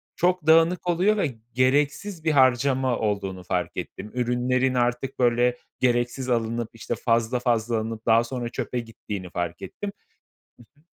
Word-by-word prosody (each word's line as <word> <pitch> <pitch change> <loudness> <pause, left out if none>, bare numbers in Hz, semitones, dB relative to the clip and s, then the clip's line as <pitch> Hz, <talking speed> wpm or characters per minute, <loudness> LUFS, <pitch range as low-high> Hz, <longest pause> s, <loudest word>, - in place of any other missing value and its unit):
Çok 180 -2 +1
dağınık 165 +3 +4
oluyor 185 +5 +3
ve 150 - -1 0.2
gereksiz 145 - +1
bir 160 - +2
harcama 130 -2 +3
olduğunu 100 -3 -2
fark 90 -1 -2
ettim. 105 - -6
Ürünlerin 125 +1 +1
artık 125 +2 -1
böyle 120 0 +3 0.2
gereksiz 120 +1 0
alınıp, 115 -1 0
işte, 115 +1 -4
fazla 115 +1 +1
fazla 120 -2 +1
alınıp 110 0 -4
daha 115 0 +5
sonra 120 0 -4
çöpe 125 +1 -3
gittiğini 105 -5 -7
fark 85 -1 -4
ettim. 205 -1 -6 0.9
Hı - - -27
hı. - - -33
120 Hz, 145 wpm, -25 LUFS, 115-135 Hz, 0.9 s, daha